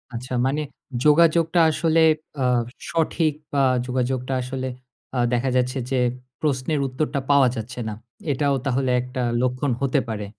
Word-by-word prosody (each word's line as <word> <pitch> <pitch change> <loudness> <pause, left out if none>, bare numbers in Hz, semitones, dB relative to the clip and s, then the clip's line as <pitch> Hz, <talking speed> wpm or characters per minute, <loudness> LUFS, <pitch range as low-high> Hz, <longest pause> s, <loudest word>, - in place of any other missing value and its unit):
আচ্ছা 125 +2 -6
মানে 140 +3 0 0.4
যোগাযোগটা 165 +2 +4
আসলে 160 +1 +2 0.4
আ - - +2 0.5
সঠিক 160 -1 +1 0.2
বা 140 - +3 0.2
যোগাযোগটা 130 +1 -1
আসলে 130 +1 -4 0.5
আ - - +1
দেখা 125 +2 +1
যাচ্ছে 125 +1 0
যে, 135 - +2 0.4
প্রশ্নের 145 0 0
উত্তরটা 140 +2 -2
পাওয়া 140 -2 +6
যাচ্ছে 125 +2 -6
না। 105 - -4 0.4
এটাও 140 0 +1
তাহলে 130 0 0
একটা 125 +1 -5 0.2
লক্ষণ 125 +2 0
হতে 140 +1 +2
পারে। 105 -2 -4
135 Hz, 140 wpm, -23 LUFS, 125-150 Hz, 0.5 s, পাওয়া